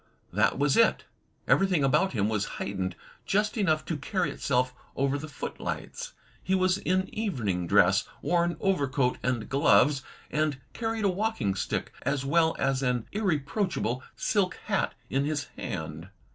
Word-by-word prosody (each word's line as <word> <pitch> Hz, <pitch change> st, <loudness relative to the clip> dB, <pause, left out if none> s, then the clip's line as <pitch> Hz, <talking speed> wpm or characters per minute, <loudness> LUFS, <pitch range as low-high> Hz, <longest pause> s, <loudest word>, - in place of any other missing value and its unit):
That 105 Hz, +4 st, +3 dB
was 140 Hz, 0 st, +2 dB
it. 230 Hz, -, +4 dB, 0.4 s
Everything 185 Hz, -6 st, +3 dB
about 160 Hz, +7 st, +3 dB
him 105 Hz, -3 st, +1 dB
was 105 Hz, -2 st, 0 dB
heightened 95 Hz, -2 st, -3 dB, 0.3 s
just 210 Hz, +1 st, +1 dB
enough 160 Hz, -8 st, +1 dB
to 165 Hz, -, -2 dB
carry 180 Hz, +6 st, -1 dB
itself 125 Hz, -1 st, 0 dB, 0.2 s
over 140 Hz, +1 st, +1 dB
the 155 Hz, -, -6 dB
footlights. 140 Hz, -, -5 dB, 0.3 s
He 190 Hz, -, +1 dB
was 185 Hz, +1 st, +2 dB
in 185 Hz, +1 st, +1 dB
evening 110 Hz, -, -1 dB
dress, -, -, +4 dB, 0.2 s
wore 175 Hz, -1 st, +3 dB
an 170 Hz, -2 st, -1 dB
overcoat 140 Hz, -9 st, +1 dB
and 125 Hz, -3 st, -1 dB
gloves, 140 Hz, 0 st, +4 dB, 0.3 s
and 150 Hz, -2 st, 0 dB
carried 225 Hz, -2 st, -2 dB
a -, -, +4 dB
walking 185 Hz, -, 0 dB
stick, 95 Hz, -, -3 dB
as 140 Hz, -1 st, -1 dB
well 160 Hz, +3 st, +3 dB
as 135 Hz, -1 st, +1 dB
an 125 Hz, -3 st, 0 dB
irreproachable 180 Hz, -, -1 dB
silk 195 Hz, -3 st, +1 dB
hat, 200 Hz, -2 st, 0 dB, 0.2 s
in 135 Hz, +1 st, +1 dB
his 150 Hz, -1 st, -1 dB
hand. 80 Hz, +3 st, -5 dB
145 Hz, 150 wpm, -28 LUFS, 125-190 Hz, 0.4 s, it